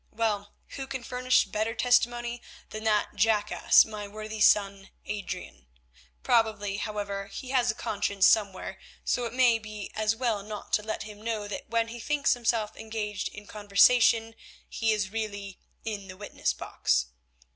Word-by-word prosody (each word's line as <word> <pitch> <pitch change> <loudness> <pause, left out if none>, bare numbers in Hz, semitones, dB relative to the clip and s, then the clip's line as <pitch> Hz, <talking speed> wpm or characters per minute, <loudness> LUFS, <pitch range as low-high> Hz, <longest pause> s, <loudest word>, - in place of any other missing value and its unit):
Well, 210 -2 -2 0.2
who 270 -1 -5
can 265 -2 -5
furnish 250 +1 +2
better 220 +2 -2
testimony 240 0 +1 0.3
than 215 +1 -6
that 210 -1 +2
jackass, 210 0 +4
my 210 -2 -6
worthy 215 +1 -7
son, 200 -2 +3 0.2
Adrian? 195 - -6 0.6
Probably, 215 -3 +1
however, 200 -2 -4
he 255 +6 -8
has 250 -2 +2
a 215 - 0
conscience 200 -2 0
somewhere, 200 -4 +2 0.3
so 245 - 0
it 230 - -5
may 245 -3 +4
be 215 -2 -8
as 215 0 +1
well 225 -4 0
not 210 +1 -8
to - - +4
let 220 +1 -4
him 210 -1 -11
know 220 -2 -3
that 205 - -6
when 230 0 +1
he 240 +1 -7
thinks 290 +3 +1
himself 230 -3 -1
engaged 215 -2 -4
in 215 - -10
conversation 225 +2 +4 0.3
he 225 -1 0
is 205 -3 -1
really 205 -3 -5 0.3
in 205 -3 -4
the 185 0 -10
witness 205 - -2
box. - - 0
215 Hz, 155 wpm, -28 LUFS, 205-230 Hz, 0.6 s, jackass